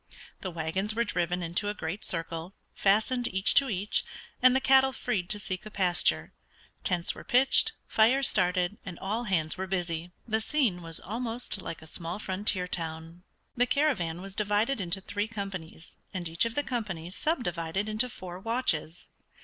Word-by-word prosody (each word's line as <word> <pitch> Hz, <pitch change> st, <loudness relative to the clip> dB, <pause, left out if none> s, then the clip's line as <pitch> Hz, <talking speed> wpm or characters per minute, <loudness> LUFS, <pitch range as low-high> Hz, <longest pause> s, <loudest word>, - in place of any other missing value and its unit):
The 190 Hz, -, -4 dB
wagons 180 Hz, +6 st, -1 dB
were 235 Hz, -, +2 dB
driven 180 Hz, -4 st, -1 dB
into 175 Hz, +5 st, -1 dB
a 210 Hz, -, -3 dB
great 175 Hz, +3 st, -4 dB
circle, 165 Hz, +2 st, -2 dB, 0.2 s
fastened 220 Hz, +5 st, +2 dB
each 190 Hz, +1 st, +3 dB
to 275 Hz, -1 st, +5 dB
each, 200 Hz, +1 st, 0 dB, 0.4 s
and 255 Hz, 0 st, +7 dB
the -, -, +5 dB
cattle 265 Hz, 0 st, +5 dB
freed 205 Hz, -9 st, -2 dB
to 210 Hz, -, +3 dB
seek 185 Hz, -2 st, -4 dB
a 215 Hz, -, -8 dB
pasture; 185 Hz, -4 st, +1 dB, 0.5 s
tents 175 Hz, -2 st, +1 dB
were -, -, -10 dB
pitched, 265 Hz, 0 st, +4 dB
fires 255 Hz, +5 st, +4 dB
started, 180 Hz, 0 st, +1 dB
and 180 Hz, -3 st, -7 dB
all 220 Hz, +5 st, -2 dB
hands 160 Hz, -6 st, 0 dB
were 190 Hz, -, -2 dB
busy. 175 Hz, -2 st, -2 dB, 0.2 s
The 220 Hz, 0 st, +1 dB
scene 230 Hz, -9 st, +1 dB
was 165 Hz, -1 st, -1 dB
almost 230 Hz, -1 st, -3 dB
like 165 Hz, -3 st, -6 dB
a -, -, -11 dB
small 165 Hz, +3 st, -4 dB
frontier 190 Hz, -2 st, +1 dB
town. 165 Hz, 0 st, -5 dB, 0.3 s
The 245 Hz, 0 st, +4 dB
caravan 215 Hz, -, +1 dB
was 195 Hz, 0 st, -6 dB
divided 210 Hz, +4 st, +1 dB
into 185 Hz, +1 st, 0 dB
three 205 Hz, +2 st, -2 dB
companies, 195 Hz, -7 st, -7 dB, 0.2 s
and 175 Hz, -2 st, -2 dB
each 165 Hz, +6 st, +2 dB
of 230 Hz, 0 st, -3 dB
the 290 Hz, -, +1 dB
companies 190 Hz, -, -4 dB
subdivided 190 Hz, -, -1 dB
into 215 Hz, +4 st, +1 dB
four 180 Hz, -6 st, -8 dB
watches. 190 Hz, -8 st, -1 dB
195 Hz, 170 wpm, -29 LUFS, 175-225 Hz, 0.5 s, and